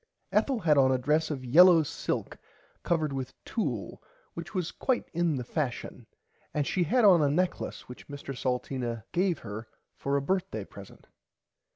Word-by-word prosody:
Ethel 260 -5 +1
had 155 -5 +4
on 130 -1 +5
a 130 - +3
dress 150 +5 +1
of 135 -4 -4
yellaw 170 +5 +7
silk - - -3 0.4
covered 155 -4 0
with 130 -1 -5
tulle 125 - -3 0.3
which 170 +4 -8
was 180 -3 -1
quite 260 -2 -1
in 170 -2 +1
the 125 - -3
fashion 130 -1 -4 0.5
and 150 -1 +1
she 185 +5 0
had 240 +8 +3
on 180 -5 +7
a 145 - +3
necklace 180 +5 -1
which 125 - -11
Mr 140 -1 -7
Salteena 125 -2 -2
gave 180 -1 +1
her 110 +2 -7 0.3
for 140 +1 -1
a - - 0
birthday 190 +4 -1
present. - - -13
150 Hz, 165 wpm, -29 LUFS, 130-175 Hz, 0.5 s, yellaw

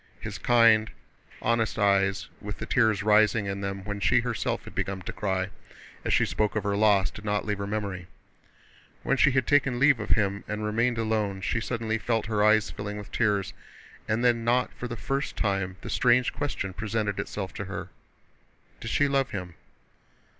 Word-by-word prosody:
His - - -6
kind, 115 -2 +5 0.5
honest 115 -1 +1
eyes, 100 -1 +2
with 105 -1 -6
the - - -5
tears 110 -5 +2
rising 105 0 +4
in 100 0 -3
them 100 -1 -4
when 100 0 -4
she - - +3
herself - - -2
had - - -11
begun 95 -1 -3
to - - -6
cry 95 -2 -2 0.5
as - - -1
she - - +4
spoke 105 -1 -1
of 110 - 0
her 100 0 0
loss, 100 -2 +3
did 105 - -11
not 105 -1 -1
leave 105 -2 -2
her 100 - -3
memory. 100 -4 -4 1.0
When 135 - +2
she 135 - +5
had 130 -2 +1
taken 140 -3 +2
leave 140 -1 +4
of 105 - -5
him 100 -1 +1
and 105 0 -3
remained 115 +3 +1
alone 110 -3 -1
she 110 - -1
suddenly 115 -1 -2
felt 115 -1 0
her 105 -1 0
eyes 110 0 +4
filling 105 0 -5
with 105 -1 -9
tears, 100 -5 0 0.5
and 110 +3 0
then 120 -1 +3
not 120 +2 +1
for 125 - -6
the 120 -1 -6
first 135 +5 -3
time 95 -3 -1
the - - -7
strange 125 +1 +3
question 115 -9 -3
presented 105 0 -2
itself 95 -2 -4
to 100 - -5
her: 95 +2 -6 0.9
did 115 - -6
she 145 +5 +2
love 135 -2 +1
him? 90 -3 -6
105 Hz, 190 wpm, -27 LUFS, 100-115 Hz, 1.0 s, kind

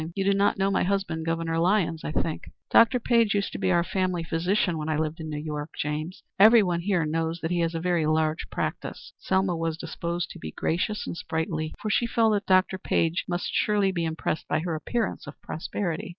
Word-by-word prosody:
You 195 - 0
do 200 +1 +3
not 200 +1 +2
know 195 +1 +1
my - - +2
husband, 180 -4 -1
Governor 165 0 0
Lyons, 170 -2 +1
I - - -3
think. 155 0 -2 0.2
Dr. 240 +2 +6
Page 230 -3 +3
used 200 -1 0
to - - -6
be - - +1
our 170 -1 +3
family 185 -2 -1
physician 170 +1 0
when 155 +1 -3
I 155 - +1
lived 160 +1 -2
in 160 -1 -5
New 150 - -4
York, 150 0 -5
James. 155 +4 -3 0.2
Everyone 205 -5 +6
here 180 -3 +1
knows 165 +2 -1
that 160 - -2
he 175 - +1
has 165 0 0
a - - -1
very 170 -2 +1
large 155 0 0
practice." - - -4
Selma 190 -1 +1
was 165 -1 -2
disposed 170 +1 -4
to - - -10
be 80 -1 -7
gracious 185 +6 -1
and - - -5
sprightly, 160 -1 -3
for 215 - -2
she 235 - +2
felt 225 -2 +3
that 205 -1 -1
Dr. 185 0 +3
Page 165 -1 0
must 175 0 -2
surely 205 -2 +2
be 170 -2 -2
impressed 160 -1 -2
by - - 0
her 170 0 -2
appearance 220 +4 -2
of 145 - -10
prosperity. 170 +1 -4
170 Hz, 215 wpm, -26 LUFS, 160-195 Hz, 0.2 s, Dr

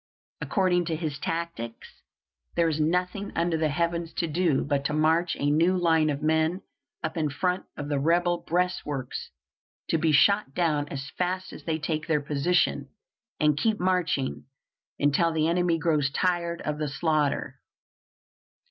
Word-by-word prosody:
According 180 -3 +1
to 165 - -1
his 155 -3 -4
tactics, 165 -9 -5 0.5
there 170 -1 +3
is 155 -1 -1
nothing 180 +5 0
under 170 0 +1
the 155 -1 +1
heavens 170 +1 -1
to 170 - -1
do 165 -2 +1
but 140 -1 0
to 150 - 0
march 160 +3 +2
a 145 +1 0
new 170 +5 +3
line 160 -3 +3
of 145 0 -3
men 160 +4 +1 0.4
up 160 +2 -3
in 155 -2 +1
front 180 +6 -1
of 145 - -4
the 145 -1 0
rebel 175 +3 +2
breastworks 150 -7 -2 0.6
to 165 - +2
be 160 0 +2
shot 200 0 +4
down 150 -4 +1
as 140 0 -6
fast 185 +1 -2
as - - -11
they 160 -1 0
take 155 0 -3
their 155 -3 +2
position, 145 0 0 0.5
and 150 -2 +3
keep 220 -2 +1
marching 180 -7 0 0.5
until 145 +4 +2
the 160 -1 +1
enemy 170 0 +2
grows 150 -3 +1
tired 170 +2 -1
of 150 0 -3
the 155 - -1
slaughter. 145 -3 0
160 Hz, 155 wpm, -27 LUFS, 150-175 Hz, 0.6 s, shot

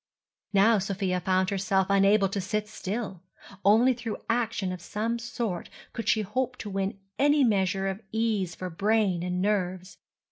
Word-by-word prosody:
Now 210 +2 +5
Sofia 190 -1 -1
found 185 +1 +1
herself 190 0 +1
unable 200 +1 +4
to 195 +1 -2
sit 210 +3 -2
still; 200 -3 -5 0.4
only 225 +6 +5
through 235 -3 -5
action 230 -5 0
of 180 -2 -6
some 225 +5 -2
sort 230 -6 -4 0.2
could 230 - -3
she 220 - +3
hope 250 +5 -2
to 205 - -6
win 195 0 -2 0.2
any 290 0 +4
measure 195 -4 +1
of 195 +2 -3
ease 215 -6 0
for 185 -1 -5
brain 200 0 +1
and 180 +1 -1
nerves. 185 -2 -1
200 Hz, 155 wpm, -27 LUFS, 185-225 Hz, 0.4 s, Now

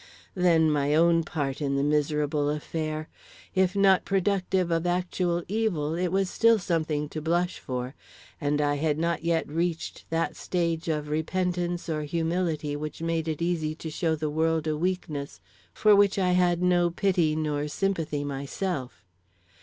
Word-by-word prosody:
Then, 165 -4 +3
my 145 0 +1
own 165 +1 +4
part 145 -3 -3
in 140 -1 0
the 140 - +1
miserable 150 0 +1
affair. 155 +1 -3 0.5
If 190 0 +2
not 195 -2 +4
productive 190 -2 0
of 165 +1 +1
actual 175 -1 0
evil, 190 -8 0
it 180 +2 0
was 190 +2 +1
still 230 +4 +4
something 160 -5 -1
to 155 - -5
blush 175 +3 0
for, 125 0 -4 0.5
and 145 +1 +1
I 145 0 +1
had 150 0 0
not 170 +1 -1
yet 165 -1 +1
reached 165 +2 -3
that 165 0 -1
stage 170 -2 -2
of 150 -2 -1
repentance 175 +2 -1
or 155 -2 -1
humility 160 -1 -1
which 155 +2 -5
made 165 -1 -1
it 160 +1 -2
easy 160 -3 -1
to 160 0 -7
show 160 0 0
the 155 0 -3
world 160 +1 +1
a 155 -1 0
weakness 155 -4 -3 0.3
for 210 -1 +5
which 200 0 +4
I 185 -2 +2
had 180 -1 +2
no 175 -1 +3
pity 175 -3 +1
nor 150 -1 -1
sympathy 160 -3 -1
myself. 140 - -4
165 Hz, 160 wpm, -27 LUFS, 150-180 Hz, 0.5 s, for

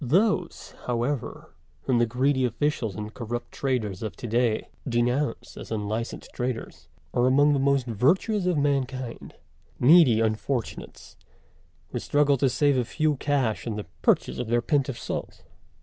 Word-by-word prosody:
Those, 180 - +1
however, 125 +2 -3 0.3
whom 125 -3 +2
the 120 - +3
greedy 130 +3 +1
officials 120 -4 -1
and 105 +1 -6
corrupt 120 0 -5
traders 115 -9 -2
of 110 -2 -4
to - - -8
day 115 -1 +1 0.2
denounce 120 +2 -1
as - - -8
unlicensed 110 +2 -4
traders, 125 -2 -4 0.3
are 125 +1 +3
among 145 +3 +4
the 140 - +1
most 140 -1 +2
virtuous 180 - +1
of 180 -3 +2
mankind 135 -4 -2 0.4
needy 135 -4 +6
unfortunates 115 +2 -3 0.7
who - - -3
struggle 145 -1 +2
to 135 +1 +2
save 140 0 +2
a - - +1
few 155 +5 0
cash 130 -6 0
in 110 - -2
the 105 - -5 0.2
purchase - - +2
of 125 - -3
their 120 +1 +1
pint 145 -2 +1
of 125 - -4
salt. - - -5
125 Hz, 150 wpm, -26 LUFS, 115-145 Hz, 0.7 s, needy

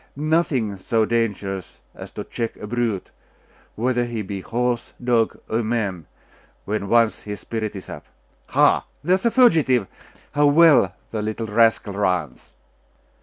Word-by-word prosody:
Nothing 145 - 0
so 110 +3 +1
dangerous 100 -5 -2
as - - -10
to - - -5
check 115 -1 -4
a - - -8
brute, 115 -3 -2 0.6
whether 120 +1 0
he 115 -2 -4
be 95 0 -5
horse, 120 +3 -2
dog, 120 -2 +1
or 110 +2 0
man, 105 -8 -2 0.6
when 100 -1 -3
once 115 -2 +3
his 105 -1 -7
spirit 110 -2 -4
is 95 - -8
up. - - -9 0.4
Ha! - - +3 0.2
there 175 +4 +2
is 190 +5 +2
a - - +5
fugitive! 160 - +4 0.5
How 145 0 +3
well 145 - +5 0.2
the 110 - -2
little 110 +2 -3
rascal 110 -1 +2
runs! 90 -9 -2
115 Hz, 145 wpm, -22 LUFS, 105-125 Hz, 0.6 s, a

